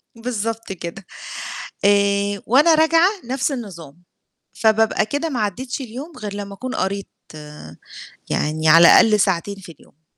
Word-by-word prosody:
بالضبط 225 -2 -4
كده. 180 +1 -8 0.8
آآ 200 0 +2
وأنا 295 +8 +5
راجعة 325 +3 +4 0.2
نفس 265 +3 -2
النظام، 175 - -9 0.5
فبابقى 220 -1 +2
كده 290 +7 -2
ما 250 - -3
عدّيتش 245 +7 -3
اليوم 265 +7 -8
غير 210 -1 -6
لمّا 200 -1 -7
أكون 255 +5 -6
قريت 200 +1 -3 1.2
يعني 155 +1 -1
على 165 +2 +8
الأقل 210 -2 +6
ساعتين 195 +1 0
في 180 -3 -12
اليوم. 155 0 -24
210 Hz, 130 wpm, -20 LUFS, 195-250 Hz, 1.2 s, على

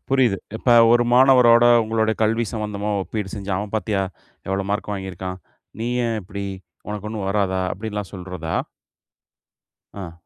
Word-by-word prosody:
புரியுது. 130 -6 +3 0.2
இப்ப 120 - 0 0.2
ஒரு 120 0 +4
மாணவரோட, 125 -2 +6 0.2
உங்களுடைய 110 0 +1
கல்வி 115 +2 +2
சம்மந்தமா 105 -1 -3
ஒப்பீடு 105 -1 -5
செஞ்சி, 100 -1 -6
"அவன் 105 +1 -5
பாத்தீயா? 105 -2 -1 0.5
எவ்வளவு 95 0 -1
மார்க் 105 0 -2
வாங்கியிருக்கான்? 95 -1 -6 0.4
நீ 115 - -1 0.2
ஏன் 115 -1 -1
இப்படி? 100 +2 -6 0.4
உனக்கு 105 0 -5
ஒண்ணும் 105 -3 -4
வராதா?" 95 -2 0
அப்டீன்னுலாம் 105 -1 -5
சொல்றதா? 90 -3 -5 1.5
ஆ. 85 -2 -7
105 Hz, 135 wpm, -22 LUFS, 95-110 Hz, 1.5 s, மாணவரோட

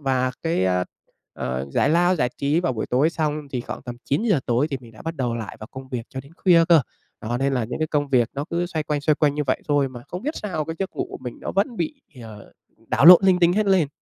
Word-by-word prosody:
và 130 -2 0
cái, 165 - 0
a, 90 -1 +1 0.5
ờ, 65 +1 -3
giải - - +2
lao, 175 +3 +3
giải 125 -5 +1
trí 145 +4 +1
vào 155 -7 0
buổi 110 - -3
tối 135 +6 +2
xong, 150 -3 -2
thì 125 - -2
khoảng - - -7
tầm 120 -1 -7
9:00 180 - +1
tối 120 +4 +2
thì 135 - -1
mình 115 -2 -15
đã 110 - -13
bắt 165 +1 -4
đầu 125 -4 -1
lại 110 -3 -6
vào 110 - -7
công 130 0 -10
việc 125 -3 -4
cho 130 - -6
đến 140 +4 -17
khuya 170 -4 +5
cơ. 165 -2 +7 0.4
Đó, 120 +2 -3
nên 135 +1 0
là 125 -3 0
những 115 - -5
cái 155 - 0
công 145 -2 0
việc 125 -3 +3
nó 140 - -3
cứ 175 +1 -1
xoay 160 -3 -3
quanh, 150 -1 -2
xoay 155 +1 +2
quanh 145 -1 +1
như 150 - -1
vậy 130 - 0
thôi 145 -2 +2
mà 125 -2 -10
không 180 - -6
biết 300 +5 -3
sao 175 -7 -3
cái 165 - -5
giấc 195 -1 -2
ngủ - - -2
của - - -7
mình 125 -2 -7
nó - - -5
vẫn 215 +5 0
bị, 305 0 -4 0.2
ờ, 110 -2 -12 0.4
đảo - - +2
lộn 180 0 +11
linh 185 -2 +4
tinh 175 -1 +4
hết 210 +2 +1
lên. 185 -7 +3
145 Hz, 280 wpm, -23 LUFS, 125-170 Hz, 0.5 s, lộn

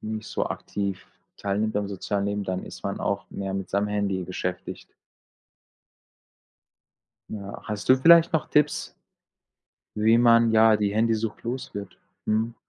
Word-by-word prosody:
nicht 110 0 -5
so - - -2
aktiv 100 -2 -4 0.3
teilnimmt 105 +2 -1
am 100 -1 -1
sozialen 100 +1 -2
Leben, 100 0 -2
dann 95 0 -3
ist - - -11
man - - -3
auch - - -2
mehr 95 -1 -4
mit 95 -2 -4
seinem 100 +2 0
Handy 100 -3 -1
beschäftigt. 90 0 -6 2.4
Ja, 100 -2 -7
hast 105 -1 -5
du 130 - +7
vielleicht 170 +5 +6
noch 160 - 0
Tipps 150 0 +1 1.0
wie 110 +2 +4
man, 115 -1 +5
ja, 110 0 +5
die 100 -1 0
Handysucht 110 0 0
loswird? 115 -5 -6 0.3
Mhm. 110 +2 0
105 Hz, 135 wpm, -25 LUFS, 100-115 Hz, 2.4 s, du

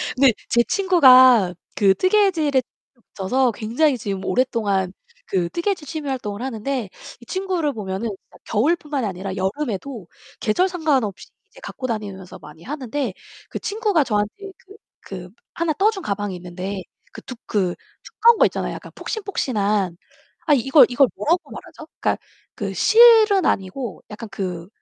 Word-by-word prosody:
근데 260 -3 +5 0.2
제 235 0 +4
친구가 255 - +6 0.2
그 195 -2 +4
뜨개질에 370 -9 +2
재미를 - - -31 0.5
붙여서 245 +6 +1
굉장히 245 +6 0
지금 200 -4 -4
오랫동안 205 -7 0 0.3
그 175 -3 0
뜨개질 340 - -2
취미 305 -1 -5
활동을 210 -5 -4
하는데 255 -2 -3 0.3
이 240 - -16
친구를 365 -5 -2
보면은 205 +1 -4
진짜 195 - -12
겨울 245 +11 +2
뿐만이 290 -6 -4
아니라 190 +1 -5
여름에도 210 - -3 0.3
계절 360 - +1
상관없이 285 - -1 0.2
이제 - - -17
갖고 255 - -6
다니면서 200 -5 -6
많이 150 +2 -14
하는데 270 - -4 0.4
그 - - -5
친구가 410 -6 +1
저한테 210 - -2 0.2
그 395 +2 -15 0.3
그 180 -2 -7 0.2
하나 335 -1 -1
떠준 390 +4 +1
가방이 200 -1 -3
있는데 185 +2 -6 0.3
그 - - -9
두 255 - -9
그 185 -5 0 0.3
두꺼운 470 0 +4
거 - - +5
있잖아요. - - -4
약간 - - -10
폭신폭신한. 210 - -2 0.5
아 300 - +5
이걸, 270 +2 +6
이걸 255 +2 +4
뭐라고 345 +4 0
말하죠? - - -11
그러니까 - - +1 0.4
그 - - -4
실은 440 -5 +6
아니고 195 +4 -2
약간 220 +2 -8
그 180 -4 -5
245 Hz, 335 characters per minute, -21 LUFS, 200-315 Hz, 0.5 s, 친구가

